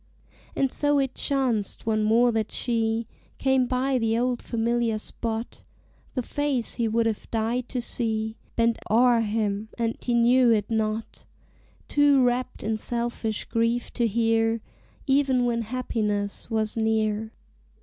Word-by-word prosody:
And 270 -1 +1
so 290 0 +2
it 270 -2 0
chanced 250 -7 -1
once 215 -1 +1
more 235 +3 +4
that 220 -2 -1
she 225 -1 0 0.3
Came 265 -2 +2
by 255 +1 +1
the 225 0 +1
old 245 0 0
familiar 235 -1 0
spot: 225 +1 -5 0.5
The 255 - -1
face 280 -3 -1
he 235 -2 0
would 225 +1 +1
have 220 -2 -2
died 230 +2 -1
to 250 -2 -3
see 220 -2 -2 0.2
Bent 230 0 +2
o'er 235 +2 +5
him, 210 -1 -1
and 230 -1 0
he 240 - 0
knew 240 +1 +5
it 215 -1 +2
not; 220 0 -2 0.6
Too 285 -3 +4
rapt 250 +1 -1
in 220 +1 -1
selfish 235 -1 -3
grief 230 +1 0
to 235 -2 +1
hear, 225 0 +1 0.4
Even 270 -3 +3
when 235 -1 0
happiness 215 -4 -2
was 220 -2 -1
near. 220 -1 0
230 Hz, 140 wpm, -26 LUFS, 220-250 Hz, 0.6 s, o'er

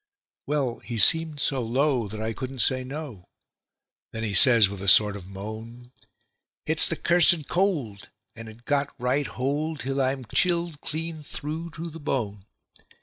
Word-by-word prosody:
Well, 140 -4 -2
he 120 - -7
seemed 160 +5 +4
so 135 -1 0
low 125 0 -1
that 110 +2 -8
I 110 +1 -3
couldn't 130 +2 -7
say 130 -1 -1
no; 130 - -9 0.9
then 115 0 -6
he 105 -3 -3
says 115 +2 +8
with 100 -1 -8
a 100 - -6
sort 105 +1 +6
of 95 -3 -10
moan: 110 +5 -10 0.7
"It's 160 +1 +3
the 165 - -2
cursed 170 -2 +3
cold, 150 - -2 0.3
and 115 -1 -9
it's 110 +2 -15
got 140 +2 -1
right 130 +4 -1
hold 145 +4 -3
till 135 +1 -2
I'm 130 -1 -2
chilled 170 - -1
clean 160 +1 -4
through 155 +3 -7
to 165 +1 -6
the 165 - -10
bone. 105 -9 -4
130 Hz, 160 wpm, -24 LUFS, 110-155 Hz, 0.9 s, says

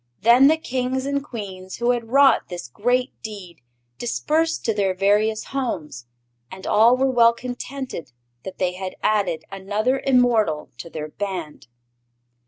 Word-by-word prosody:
Then 240 +5 +6
the 315 +2 +4
Kings 260 -2 -2
and 280 0 -1
Queens 190 -8 -7
who 240 +1 +1
had 235 -2 -3
wrought 275 +2 +4
this 175 -7 -6
great 250 - 0
deed 195 -6 -9 0.4
dispersed 315 +7 0
to 225 - +2
their 195 -3 0
various 210 +3 +2
homes, 155 - -4 0.4
and 190 0 -10
all 230 +4 +5
were 265 0 +2
well 235 -2 +5
contented 250 - -6 0.3
that 190 +6 -8
they 180 -1 0
had 185 0 -6
added 180 -7 +1
another 210 +7 -1
immortal 235 - +2
to 170 - -8
their 155 -1 -6
Band. 180 -6 -6
220 Hz, 145 wpm, -22 LUFS, 185-250 Hz, 0.4 s, Then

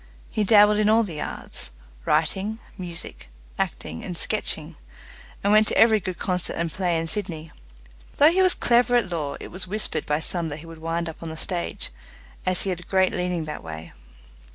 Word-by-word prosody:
He 215 - +1
dabbled 210 0 +6
in 215 0 +3
all 225 +1 +5
the 165 -8 -5
arts - - -4 0.4
writing, 205 +3 +1 0.2
music, 170 - -4 0.3
acting, 80 - -3
and 180 - -4
sketching, 165 -7 0 0.7
and 200 +1 +3
went 215 0 +6
to - - +1
every 220 -1 +6
good 185 -1 -5
concert 180 -1 -2
and 170 -1 -1
play 175 -2 0
in 165 0 -2
Sydney. 165 -5 -4 0.7
Though 295 +3 +7
he 375 +2 +3
was 370 -1 +4
clever 245 0 +3
at 215 -7 +2
law, 150 -4 -2
it - - -8
was 185 0 -2
whispered 195 -6 -1
by 150 +1 +1
some 170 0 0
that 145 - -4
he 160 - -11
would 165 -1 -11
wind 165 +1 -2
up 160 - -8
on 165 - -5
the 160 - -7
stage, 175 +1 -1 0.6
as 185 -1 +3
he 195 - 0
had 175 - -3
a - - -11
great 190 0 +2
leaning 180 -2 -1
that 155 - -5
way. 80 0 -8
180 Hz, 200 wpm, -24 LUFS, 160-210 Hz, 0.7 s, Though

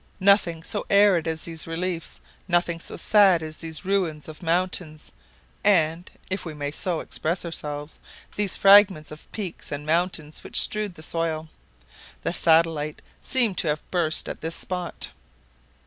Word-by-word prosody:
Nothing 190 -4 +3
so - - -4
arid 200 -5 +4
as 160 -1 -2
these 165 -1 -4
reliefs, 165 0 -4 0.3
nothing 175 -2 +1
so - - -6
sad 195 -6 +5
as 155 0 -7
these 160 0 -4
ruins 180 -6 -1
of 155 +2 -10
mountains, 170 -2 -1 0.5
and 170 -4 +2 0.2
(if 190 +1 -3
we 160 -3 -7
may 145 -1 -4
so 170 +2 -2
express 170 +3 -3
ourselves) 150 -2 -5 0.4
these 205 -2 +1
fragments 195 -6 +6
of 155 - -12
peaks 195 -6 -6
and 145 0 -5
mountains 160 -1 -1
which - - +2
strewed 210 -4 +2
the 155 - -11
soil. 160 -1 -2 0.7
The - - -1
satellite 160 -2 +2 0.2
seemed 235 -7 +1
to - - -1
have 150 0 -3
burst 165 -4 0
at - - -6
this 165 +1 -2
spot. 180 -2 -4
165 Hz, 150 wpm, -24 LUFS, 155-185 Hz, 0.7 s, fragments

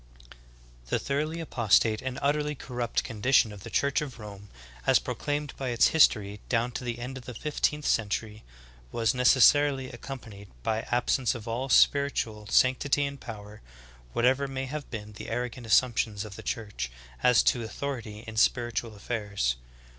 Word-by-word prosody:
1. - - -15 0.5
The - - +1
thoroughly 155 +4 -2
apostate 110 -7 +2
and 130 -1 -4
utterly 150 +1 +1
corrupt 125 -3 -2
condi 115 +3 -3
tion 110 - +5
of 100 - -11
the 115 - -8
Church 140 +6 +1
of 135 -6 -6
Rome 100 -2 -10 0.4
as - - +6
proclaimed 145 -1 -3
by 135 -2 -3
its 120 -1 +4
history 105 -10 +3
down 120 0 +1
to 125 - -5
the 120 -1 -3
end 130 +2 -6
of 120 - -15
the 125 - -8
fifteenth 150 +2 -1
century,^ 110 0 -1 0.5
was 115 -1 +1
necessarily 135 +1 +4
accompanied 115 -5 -9 0.2
by 110 0 0
absence 125 0 +1
of 115 -1 -8
all 125 +4 -2
spiritual 120 -8 +3
sanctity 130 +5 +3
and 140 -1 -6
power 105 -2 -9 0.5
whatever 130 +4 +2
may 135 0 -4
have 145 +2 -6
been 105 -2 -7
the 105 - -8
arrogant 120 0 -4
assumptions 110 -3 +2
of 100 -2 -9
the - - -8
Church 100 - -4 0.3
as 125 -1 +5
to 120 - +2
authority 115 -3 -5
in 110 -1 -8
spiritual 120 -1 +1
affairs. 100 - -2
120 Hz, 160 wpm, -28 LUFS, 110-135 Hz, 0.5 s, as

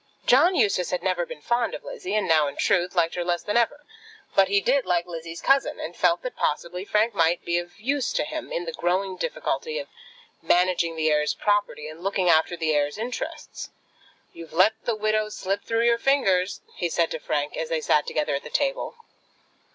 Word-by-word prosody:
John 325 +9 +5
Eustace 190 - +2
had 180 -1 -2
never 180 -2 0
been 150 - -9
fond 240 0 0
of - - -9
Lizzie, 435 - -5
and 215 - +1
now, 155 -3 +4
in 140 - -5
truth, 180 -2 +1
liked 165 -1 +2
her 175 - -2
less 175 0 -1
than 210 - -2
ever; 290 +5 +1 0.5
but 195 -1 +5
he 200 +1 +3
did 265 +6 +2
like 175 -1 +1
Lizzie's 165 -1 -7
cousin, 275 0 +2
and 165 +2 -6
felt 175 -1 +2
that 255 - -5
possibly 170 +4 -2
Frank 215 +3 +1
might 165 +1 +1
be 170 0 +1
of 175 +3 -10
use 270 +3 -1
to - - +1
him 310 +1 -6
in 175 - -2
the 165 - -4
growing 185 +3 -1
difficulty 475 - -3
of - - -5 0.5
managing 175 -2 +2
the 160 -1 +1
heir's 150 0 +1
property 205 -7 0
and 155 +3 -10
looking 195 -2 +1
after 160 +2 +2
the 160 -2 0
heir's 145 +2 0
interests. 235 +3 -5 0.6
"You've 165 -1 -11
let 185 +6 +5
the 235 - 0
widow 215 0 0
slip 195 -1 -3
through 230 +1 +1
your 235 0 +3
fingers," 200 -9 +2
he 175 - -2
said 165 0 +1
to 160 - -3
Frank, 145 0 -2
as 160 - -3
they 165 - 0
sat 150 -1 +2
together 150 -1 -1
at 140 - -2
the - - -8
table. 275 - -1
180 Hz, 205 wpm, -25 LUFS, 165-225 Hz, 0.6 s, John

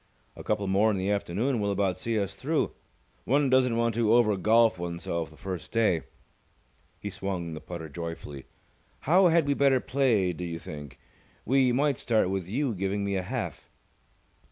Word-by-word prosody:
A - - -9
couple 100 - -1
more 100 +3 +3
in 105 - 0
the 95 +2 -1
afternoon 105 +6 -1
will 100 -1 0
about 100 -2 0
see 115 +5 -2
us 100 -4 -3
through. - - -1 0.5
One 140 +1 +2
doesn't 125 -3 +3
want 115 0 +1
to 115 0 +3
over 110 -4 +4
golf 110 +2 +3
oneself 85 -2 -3
the 80 - -17
first 90 -4 -6
day." 105 -8 +2 1.0
He 105 - -5
swung 90 -4 -4
the 80 - -7
putter 85 -2 -7
joyfully. 75 -3 -7 0.6
"How 180 +5 +5
had 165 -3 +3
we 140 - +3
better 140 -2 +3
play 120 -10 +1
do 90 - -7
you 85 -1 -4
think? 75 -5 -9 0.5
We 130 +1 +3
might 140 +1 +1
start 110 -5 +1
with 95 -2 -3
you 130 +3 0
giving 100 +1 -2
me 100 0 -1
a 95 - 0
half." 90 - -5
100 Hz, 180 wpm, -28 LUFS, 90-120 Hz, 1.0 s, How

